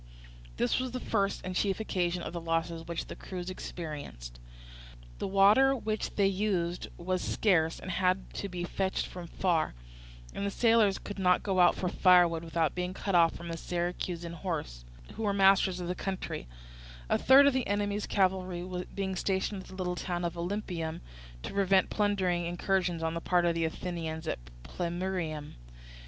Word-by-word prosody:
This 120 - +2
was 255 0 -2
the 255 - -2
first 200 -5 0
and 185 0 -4
chief 195 +2 +1
occasion 180 -5 -1
of - - -5
the 170 - -4
losses 165 0 -2
which 170 -1 -3
the - - -8
crews 185 -1 -6
experienced. 145 - -7 0.8
The - - -2
water 205 +8 +5
which 215 -4 -3
they 200 - +3
used 190 -3 0
was 185 +1 -1
scarce 165 -6 +2
and 185 - -6
had 185 +1 0
to 200 - -4
be 175 -1 -4
fetched 190 +2 -1
from 180 -2 -8
far, 170 - 0 0.6
and - - -4
the 200 - 0
sailors 225 -2 +3
could 205 -1 -7
not 180 -1 +3
go 190 -2 0
out 175 -1 +6
for 185 - -2
firewood 175 -2 +4
without 165 -2 0
being 180 +1 -3
cut 195 - -3
off 170 -2 +4
by 170 - -9
the 165 -1 -4
Syracusan 175 0 -3
horse, 155 - -4 0.3
who 225 - -7
were 205 -2 +1
masters 195 -1 +4
of 175 - -4
the 180 - -1
country; 185 - -4 0.6
a - - +2
third 270 +2 +7
of 280 - +5
the 260 -2 0
enemy's 205 0 -1
cavalry 185 -2 0 0.3
being 190 -1 -2
stationed 190 +1 -1
at - - -14
the 190 - -11
little 180 -1 -2
town 175 0 -3
of 170 - -1
Olympieum, 175 -2 -3 0.4
to - - -5
prevent 195 -1 +3
plundering 190 -5 +1
incursions 175 -1 0
on 160 0 0
the 170 - -3
part 175 0 +2
of 170 - +3
the 165 0 0
Athenians 160 -1 -4
at - - -2 0.2
Plemmyrium. 170 - -3
180 Hz, 175 wpm, -30 LUFS, 170-195 Hz, 0.8 s, third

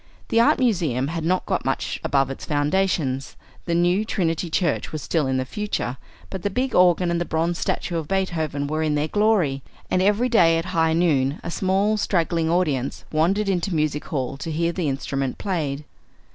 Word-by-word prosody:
The 230 - +3
Art 235 - +5
Museum 165 - +1
had 165 0 -3
not 180 +3 +1
got - - -1
much - - -2
above 135 -1 +1
its 135 - -8
foundations; 145 -3 0 0.3
the 170 - 0
new 175 +4 +2
Trinity 175 -5 -1
Church 165 -1 0
was 155 -3 -5
still 150 +4 0
in 130 0 0
the 130 - -1
future; 205 -8 -3 0.3
but 190 - -5
the 205 - -1
big 255 +5 -1
organ 180 -1 +4
and 170 0 0
the - - +2
bronze 170 +1 -1
statue 170 - -2
of 160 -2 -4
Beethoven 160 -7 -1
were 155 +2 -2
in 155 -1 +1
their 150 +1 0
glory, 200 -10 +2 0.3
and 185 - +2
every 205 +5 +3
day 170 -9 +4
at 165 - -2
high 160 -1 +3
noon 150 -4 +2
a 170 - -4
small 195 +4 +1
straggling 170 -4 0
audience 150 -7 0
wandered 185 +7 +1
into 185 -1 0
Music 150 -1 -1
Hall 135 -4 -3
to 165 - -6
hear 165 +2 0
the 170 -4 -1
instrument 135 -1 -2
played. 150 -7 -2
165 Hz, 190 wpm, -23 LUFS, 145-185 Hz, 0.3 s, Art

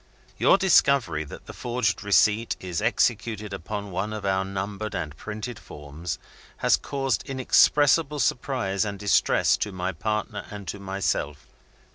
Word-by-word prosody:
"Your - - +5
discovery 140 - +3
that - - -11
the - - -9
forged 120 -2 -1
receipt 105 +2 +3
is 90 -2 -3
executed 110 -2 0
upon 100 +2 -5
one 95 +4 -2
of 105 -2 -5
our 95 -1 +1
numbered 100 +2 -4
and 75 -2 -4
printed 110 +5 -6
forms 75 +2 -7 0.4
has - - +4
caused 135 -1 -2
inexpressible 145 +3 +4
surprise 120 -6 0
and 100 -2 -4
distress 100 0 +3
to 105 - -2
my 95 0 -2
partner 105 +5 -3
and 105 -3 -8
to 100 - -5
myself. 95 -7 -2
105 Hz, 140 wpm, -25 LUFS, 95-120 Hz, 0.4 s, Your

